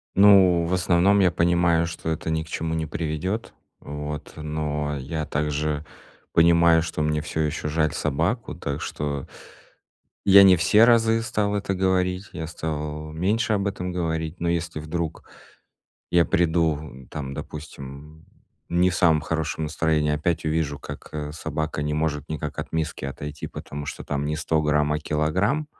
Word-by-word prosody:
Ну, 95 Hz, -4 st, +6 dB
в 85 Hz, -, -1 dB
основном 90 Hz, +2 st, +3 dB
я 90 Hz, -3 st, +4 dB
понимаю, 85 Hz, -1 st, +2 dB
что 80 Hz, -1 st, -5 dB
это 80 Hz, 0 st, -2 dB
ни 80 Hz, 0 st, 0 dB
к -, -, -16 dB
чему 80 Hz, 0 st, -2 dB
не 80 Hz, -1 st, -1 dB
приведёт, 80 Hz, +7 st, -3 dB, 0.3 s
вот. 75 Hz, +1 st, -6 dB
Но 75 Hz, -1 st, -2 dB
я 75 Hz, +4 st, -4 dB
также 75 Hz, +1 st, -1 dB, 0.5 s
понимаю, 85 Hz, 0 st, +5 dB
что 80 Hz, -2 st, -3 dB
мне 75 Hz, 0 st, +1 dB
всё 80 Hz, +1 st, -5 dB
ещё 75 Hz, 0 st, -2 dB
жаль 75 Hz, 0 st, +1 dB
собаку. 80 Hz, -, -1 dB
Так 70 Hz, -4 st, -4 dB
что 70 Hz, -2 st, -3 dB, 1.0 s
Я 100 Hz, 0 st, +9 dB
не 95 Hz, -1 st, +8 dB
все 105 Hz, +6 st, +5 dB
разы 115 Hz, -1 st, +4 dB
стал 105 Hz, -2 st, -1 dB
это 100 Hz, -1 st, -1 dB
говорить, 95 Hz, +1 st, 0 dB
я 80 Hz, -, -5 dB
стал 75 Hz, -1 st, -4 dB
меньше 100 Hz, +8 st, 0 dB
об 100 Hz, -1 st, 0 dB
этом 90 Hz, -2 st, -3 dB
говорить. 80 Hz, -1 st, -2 dB
Но 85 Hz, -, -1 dB
если 85 Hz, -2 st, -2 dB
вдруг 80 Hz, +1 st, -4 dB, 0.8 s
я 85 Hz, -1 st, +5 dB
приду 80 Hz, -6 st, 0 dB
там, 70 Hz, -2 st, -5 dB
допустим, 75 Hz, +1 st, -9 dB, 0.4 s
не 90 Hz, +1 st, +3 dB
в 90 Hz, -, -3 dB
самом 80 Hz, -5 st, +4 dB
хорошем 80 Hz, 0 st, -2 dB
настроении, 75 Hz, -1 st, +1 dB
опять 80 Hz, +2 st, -1 dB
увижу, 75 Hz, -2 st, -1 dB
как, -, -, -9 dB
э, 75 Hz, -1 st, -4 dB
собака 75 Hz, -1 st, -3 dB
не 75 Hz, 0 st, -1 dB
может 75 Hz, -2 st, -1 dB
никак 75 Hz, -1 st, -4 dB
от -, -, -6 dB
миски 80 Hz, -3 st, -2 dB
отойти, 75 Hz, +2 st, -5 dB
потому 75 Hz, +1 st, -7 dB
что -, -, -6 dB
там 70 Hz, 0 st, -2 dB
не 75 Hz, +1 st, -1 dB
100 80 Hz, +1 st, +1 dB
грамм, 75 Hz, 0 st, +2 dB
а 75 Hz, -, -1 dB
килограмм. 95 Hz, -, 0 dB
80 Hz, 160 wpm, -24 LUFS, 75-85 Hz, 1.0 s, Я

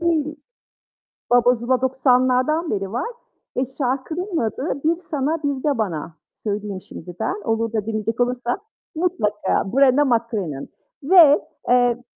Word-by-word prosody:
değil. 315 Hz, -3 st, 0 dB, 0.9 s
Baba 245 Hz, 0 st, +5 dB
Zula 245 Hz, +2 st, 0 dB
90'lardan 260 Hz, +4 st, +2 dB
beri 195 Hz, -1 st, -2 dB
var 245 Hz, -, -2 dB, 0.5 s
ve 255 Hz, -, +1 dB, 0.2 s
şarkının 315 Hz, +8 st, -2 dB
adı 265 Hz, +5 st, -2 dB
"Bir 330 Hz, +1 st, +3 dB
Sana 300 Hz, +2 st, 0 dB
Bir 280 Hz, -2 st, -1 dB
de 290 Hz, -5 st, +1 dB
Bana" 170 Hz, -6 st, -3 dB, 0.3 s
söyleyeyim 205 Hz, -2 st, -3 dB
şimdi 175 Hz, +2 st, -9 dB
ben. 390 Hz, -, -2 dB
Olur 225 Hz, 0 st, 0 dB
da 215 Hz, -2 st, -2 dB
dinleyecek 225 Hz, +1 st, -2 dB
olursan 245 Hz, +3 st, 0 dB, 0.4 s
mutlaka 210 Hz, -, 0 dB
Brenna 275 Hz, +1 st, +5 dB
MacCrimmon 225 Hz, -, -1 dB, 0.3 s
ve, 310 Hz, -2 st, +7 dB, 0.3 s
eee, 245 Hz, -1 st, +3 dB
250 Hz, 130 wpm, -22 LUFS, 220-290 Hz, 0.9 s, ve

